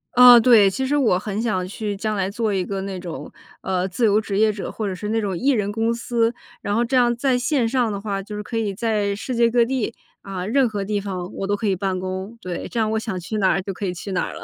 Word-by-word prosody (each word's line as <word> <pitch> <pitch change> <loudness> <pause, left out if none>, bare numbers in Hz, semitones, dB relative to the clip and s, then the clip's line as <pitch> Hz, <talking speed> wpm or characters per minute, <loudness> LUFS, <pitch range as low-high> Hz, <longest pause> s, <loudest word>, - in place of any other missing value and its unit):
嗯， 245 -1 +9
对。 220 -4 +6
其 265 +7 -2
实 290 - +1
我 225 -10 +3
很 205 +1 -3
想 185 -6 -1
去 205 +1 -4
将 215 +1 -2
来 195 -1 -1
做 220 -1 -1
一 185 -2 0
个 195 -1 -3
那 190 -1 -5
种， 175 -2 -7 0.3
呃， 185 0 -1
自 225 +6 0
由 210 0 +4
职 200 -2 -3
业 215 -1 +4
者， 205 - -6
或 215 -2 -3
者 185 - -3
是 210 +3 -5
那 225 0 +1
种 195 -4 -2
1 275 - +1
人 205 -4 0
公 225 +2 0
司。 235 0 0 0.3
然 205 - -1
后 235 - +2
这 255 +2 +1
样 240 -1 +3
在 255 0 +1
线 250 -2 +1
上 245 -3 +1
的 200 -1 -4
话， 200 -2 -3
就 210 +2 -8
是 210 - -4
可 225 +2 -5
以 210 -3 -1
在 205 -2 0
世 250 +4 -4
界 235 0 +4
各 240 0 +4
地， 235 -2 -1 0.3
啊， 190 -2 -5
任 255 +3 +3
何 205 -2 -3
地 205 +1 -1
方 185 -2 -5
我 195 - -3
都 205 - +1
可 215 0 -2
以 195 - +2
办 185 0 -2
公。 190 +4 -5
对， 180 -1 -5
这 235 - -3
样 215 -1 +1
我 220 - +1
想 220 -5 -4
去 200 +5 -4
哪 190 -2 +3
儿 195 - +1
就 195 - -5
可 200 - -5
以 180 - -2
去 190 +3 -7
哪 185 - 0
儿 - - -7
了。 - - -9
210 Hz, 305 characters per minute, -22 LUFS, 195-230 Hz, 0.3 s, 嗯